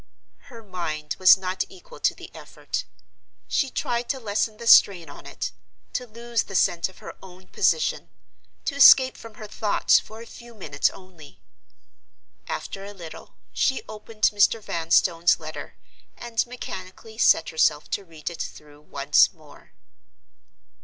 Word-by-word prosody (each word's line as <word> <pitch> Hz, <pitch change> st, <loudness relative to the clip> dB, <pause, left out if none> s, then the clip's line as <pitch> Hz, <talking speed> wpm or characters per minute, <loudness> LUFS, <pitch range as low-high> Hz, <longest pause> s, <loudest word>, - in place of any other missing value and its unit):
Her 235 Hz, -5 st, -13 dB
mind 160 Hz, -6 st, -5 dB
was 185 Hz, +1 st, +8 dB
not 185 Hz, 0 st, -2 dB
equal -, -, -15 dB
to -, -, +1 dB
the -, -, -12 dB
effort. -, -, -6 dB, 0.6 s
She 275 Hz, -, 0 dB
tried 240 Hz, -1 st, -3 dB
to 270 Hz, -, -1 dB
lessen 215 Hz, -1 st, -2 dB
the 235 Hz, -, -9 dB
strain 175 Hz, -8 st, +5 dB
on -, -, -13 dB
it—to 250 Hz, -, -7 dB
lose 235 Hz, 0 st, -2 dB
the 195 Hz, -, -8 dB
sense 175 Hz, -1 st, +2 dB
of 190 Hz, -, -19 dB
her -, -, -10 dB
own 185 Hz, 0 st, -15 dB
position—to 470 Hz, -, -2 dB
escape 260 Hz, -2 st, +7 dB
from 225 Hz, -2 st, -12 dB
her 215 Hz, -, -9 dB
thoughts 210 Hz, 0 st, +2 dB
for 220 Hz, +1 st, -12 dB
a 230 Hz, -, -10 dB
few 235 Hz, 0 st, -14 dB
minutes 145 Hz, -8 st, 0 dB
only. 175 Hz, -6 st, -15 dB, 1.1 s
After 195 Hz, -, -5 dB
a 200 Hz, +1 st, -9 dB
little, 170 Hz, -4 st, -11 dB, 0.2 s
she 265 Hz, -, 0 dB
opened 215 Hz, 0 st, -12 dB
Mr. 205 Hz, +2 st, +3 dB
Vanstone's 170 Hz, -2 st, +2 dB
letter, 155 Hz, -2 st, -8 dB, 0.4 s
and 235 Hz, 0 st, -2 dB
mechanically 220 Hz, -2 st, -9 dB
set 165 Hz, -, +4 dB
herself 155 Hz, -1 st, +1 dB
to 200 Hz, -, -2 dB
read 165 Hz, -2 st, -7 dB
it 170 Hz, -, -7 dB
through 150 Hz, -1 st, -9 dB
once 140 Hz, -1 st, +3 dB
more. -, -, -19 dB
195 Hz, 145 wpm, -24 LUFS, 165-230 Hz, 1.1 s, was